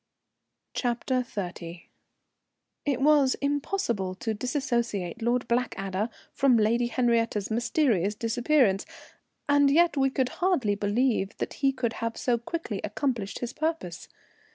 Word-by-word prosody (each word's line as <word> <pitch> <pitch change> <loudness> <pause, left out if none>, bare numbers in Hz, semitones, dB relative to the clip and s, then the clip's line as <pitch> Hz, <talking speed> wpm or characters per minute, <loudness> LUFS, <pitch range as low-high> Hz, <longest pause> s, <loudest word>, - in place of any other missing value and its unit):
CHAPTER 245 +1 -1
XXX. 175 -6 -6 1.0
It 270 -2 +1
was 285 -2 +5
impossible 280 - -1
to 220 +4 -2
disassociate 235 - -2
Lord 240 +1 +1
Blackadder 215 -4 -1 0.2
from 265 -3 +4
Lady 230 +3 +2
Henriette's 230 -4 +1
mysterious 230 - +1
disappearance, 230 -2 +2 0.6
and 285 -1 +5
yet 335 +3 +4
we 270 -1 +3
could 260 -1 0
hardly 345 - +1
believe 205 0 0
that - - -3
he 275 -1 +4
could 245 -4 -2
have 230 0 -2
so 240 -2 +1
quickly 235 - -4
accomplished 215 -2 -2
his 245 +1 -3
purpose. 310 - -3
240 Hz, 120 wpm, -27 LUFS, 210-270 Hz, 1.0 s, was